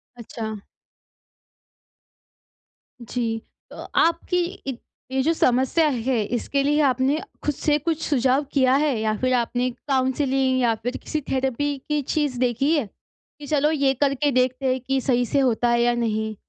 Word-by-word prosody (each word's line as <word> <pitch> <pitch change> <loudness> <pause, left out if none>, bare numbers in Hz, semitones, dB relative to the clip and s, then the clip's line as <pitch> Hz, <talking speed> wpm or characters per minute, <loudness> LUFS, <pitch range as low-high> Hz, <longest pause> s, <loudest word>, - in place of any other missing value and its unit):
अच्छा। 220 -2 -6 2.4
जी, 230 -1 -3 0.3
तो - - -12 0.3
आपकी 335 +2 0 0.3
इ 260 - -4 0.3
ये 265 - +1
जो 325 - +2
समस्या 265 +3 +2
है, 255 -2 0 0.2
इसके 275 +3 -1
लिए 295 +2 +2
आपने 265 +2 +2 0.2
खुद 295 - 0
से 295 -1 +1
कुछ 320 +1 -2
सुझाव 265 0 +2
किया 260 -2 +4
है 285 -3 +1
या 215 0 0
फिर 255 0 0
आपने 245 +1 0 0.2
काउंसलिंग 265 0 +1
या 235 -2 +3
फिर 245 +2 -2
किसी 305 - -4
थेरेपी 270 +2 -1
की 300 -1 +1
चीज़ 285 -2 -1
देखी 255 +5 +1
है? 290 -6 0 0.5
कि 290 - -9
चलो 295 +1 +2
ये 275 -3 +2
करके 280 0 +2
देखते 255 +1 +1
हैं 260 - -3
कि 270 +1 0
सही 245 -2 +1
से 280 - 0
होता 245 -2 +2
है 235 0 +3
या 240 0 +3
नहीं। 220 -2 -1
260 Hz, 155 wpm, -23 LUFS, 245-285 Hz, 2.4 s, किया